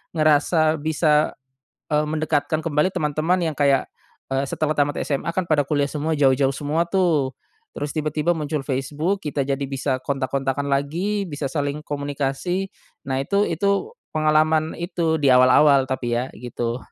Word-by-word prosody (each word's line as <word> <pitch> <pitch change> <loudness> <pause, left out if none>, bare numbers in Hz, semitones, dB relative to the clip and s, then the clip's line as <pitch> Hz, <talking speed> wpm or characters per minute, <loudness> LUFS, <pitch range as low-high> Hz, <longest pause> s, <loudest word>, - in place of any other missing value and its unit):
ngerasa 155 +1 +3
bisa, 150 0 +2 0.6
eee, 150 0 +3
mendekatkan 155 0 0
kembali 150 +1 +2
teman-teman 155 +2 0
yang 150 - -9
kayak, 140 -2 +3 0.5
eee, 135 +1 +1
setelah 155 +2 0
tamat 145 0 +2
SMA 140 +3 -2
kan 185 - +2
pada 150 -2 +3
kuliah 145 -2 +1
semua 155 +2 -1
jauh-jauh 135 -1 +3
semua 150 +4 -1
tuh, 165 -8 +1 0.4
terus 145 - -3
tiba-tiba 155 +1 -1
muncul 155 -3 -3
Facebook 150 +8 -2
kita 145 -1 -1
jadi 140 +1 -2
bisa 135 -1 -1
kontak-kontakan 135 0 -2
lagi 175 +9 -1
bisa 145 -2 -4
saling 145 +1 -2
komunikasi, 145 +6 -2 0.4
nah 130 - 0
itu 200 +9 +1
itu, 200 - 0 0.2
pengalaman 155 +1 +2
itu 170 -2 -1
di 145 - +2
awal-awal 130 +2 +6
tapi 120 -2 -1
ya 125 +2 -2
gitu. 120 0 -3
150 Hz, 145 wpm, -22 LUFS, 140-160 Hz, 0.6 s, awal-awal